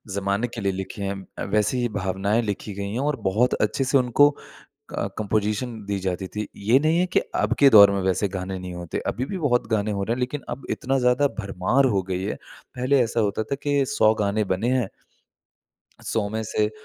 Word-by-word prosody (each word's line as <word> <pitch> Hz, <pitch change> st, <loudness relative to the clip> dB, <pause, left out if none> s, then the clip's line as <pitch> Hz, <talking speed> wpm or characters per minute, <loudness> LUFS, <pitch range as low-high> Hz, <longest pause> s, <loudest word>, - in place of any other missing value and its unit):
ज़माने 100 Hz, +4 st, 0 dB
के 115 Hz, -1 st, -7 dB
लिए 100 Hz, -1 st, +1 dB
लिखे 95 Hz, +1 st, -6 dB
हैं 100 Hz, 0 st, -2 dB, 0.2 s
अ, -, -, -2 dB
वैसी 105 Hz, +5 st, +1 dB
ही 120 Hz, -, 0 dB
भावनाएँ 95 Hz, +4 st, 0 dB
लिखी 105 Hz, -1 st, -4 dB
गई 100 Hz, 0 st, -4 dB
हैं 115 Hz, -, -2 dB
और 150 Hz, -, 0 dB
बहुत 120 Hz, +6 st, +2 dB
अच्छे 135 Hz, -, -1 dB
से 135 Hz, +1 st, +3 dB
उनको 130 Hz, +3 st, +5 dB, 0.4 s
क -, -, -6 dB
कंपोज़िशन 110 Hz, +3 st, -1 dB
दी 100 Hz, -1 st, -1 dB
जाती 95 Hz, 0 st, -2 dB
थी। 105 Hz, +2 st, -4 dB
ये 115 Hz, +6 st, +3 dB
नहीं 160 Hz, +2 st, +3 dB
है 180 Hz, -, +2 dB
कि 185 Hz, -, +2 dB, 0.2 s
अब 105 Hz, +2 st, 0 dB
के 140 Hz, -, +7 dB
दौर 100 Hz, -4 st, +9 dB
में 100 Hz, 0 st, -1 dB
वैसे 95 Hz, +2 st, +1 dB
गाने 95 Hz, 0 st, -4 dB
नहीं 90 Hz, 0 st, -7 dB
होते। 90 Hz, -1 st, -5 dB
अभी 125 Hz, -, -1 dB
भी 185 Hz, +8 st, -5 dB
बहुत 125 Hz, -8 st, +1 dB
गाने 110 Hz, -1 st, +1 dB
हो 100 Hz, -, -2 dB
रहे 115 Hz, -, -1 dB
हैं, -, -, -7 dB
लेकिन 125 Hz, +4 st, -2 dB
अब 120 Hz, +3 st, -6 dB
इतना 135 Hz, +1 st, 0 dB
ज़्यादा 125 Hz, +3 st, +3 dB
भरमार 100 Hz, +5 st, +1 dB
हो 95 Hz, -, +1 dB
गई 95 Hz, 0 st, -2 dB
है। 100 Hz, -, -2 dB, 0.4 s
पहले 130 Hz, +3 st, +2 dB
ऐसा 115 Hz, 0 st, 0 dB
होता 105 Hz, 0 st, 0 dB
था 125 Hz, -, -3 dB
कि 145 Hz, -1 st, +2 dB
100 110 Hz, -3 st, +3 dB
गाने 105 Hz, +1 st, +1 dB
बने 95 Hz, +6 st, 0 dB
हैं, 125 Hz, -6 st, +1 dB, 1.2 s
100 105 Hz, -3 st, -1 dB
में 110 Hz, +2 st, -3 dB
से 105 Hz, 0 st, 0 dB
110 Hz, 215 wpm, -24 LUFS, 100-125 Hz, 1.2 s, दौर